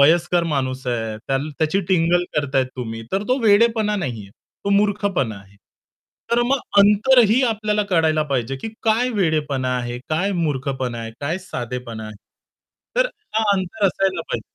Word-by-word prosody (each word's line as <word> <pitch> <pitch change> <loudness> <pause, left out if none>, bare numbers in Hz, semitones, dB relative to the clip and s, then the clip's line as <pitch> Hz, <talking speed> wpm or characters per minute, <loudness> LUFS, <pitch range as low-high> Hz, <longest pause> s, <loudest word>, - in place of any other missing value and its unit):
वयस्कर 170 +4 +4
माणूस 130 -2 -2
आहे, 115 -3 -2
त्या 135 - +1 0.2
त्याची 160 +5 +1
टिंगल 175 -1 +3
करताय 140 -3 +1
तुम्ही. 120 -3 -6
तर 195 - +1
तो 255 +2 +2
वेडेपणा 215 0 +3
नाही 130 - -3
आहे. 100 - -14 0.3
तो 200 - 0
मूर्खपणा 200 - +1
आहे. 100 +1 -16 0.8
तर 235 - +4
मग 275 +2 +2 0.2
अंतरही 220 +4 +5
आपल्याला 215 -3 +1
कळायला 160 -3 +3
पाहिजे, 135 -3 -2
की 135 - -6
काय 225 +3 +2
वेडेपणा 155 - 0
आहे, 120 0 -4
काय 180 +6 0
मूर्खपणा 135 -7 -2
आहे, 115 -1 -5
काय 155 +5 -2
साधेपणा 125 -9 -6
आहे. 110 0 -10 0.8
तर - - +4 0.3
हां 220 - +2
अंतर 195 +3 0
असायला 195 0 0
पाहिजे. - - -4
165 Hz, 155 wpm, -21 LUFS, 130-205 Hz, 0.8 s, अंतरही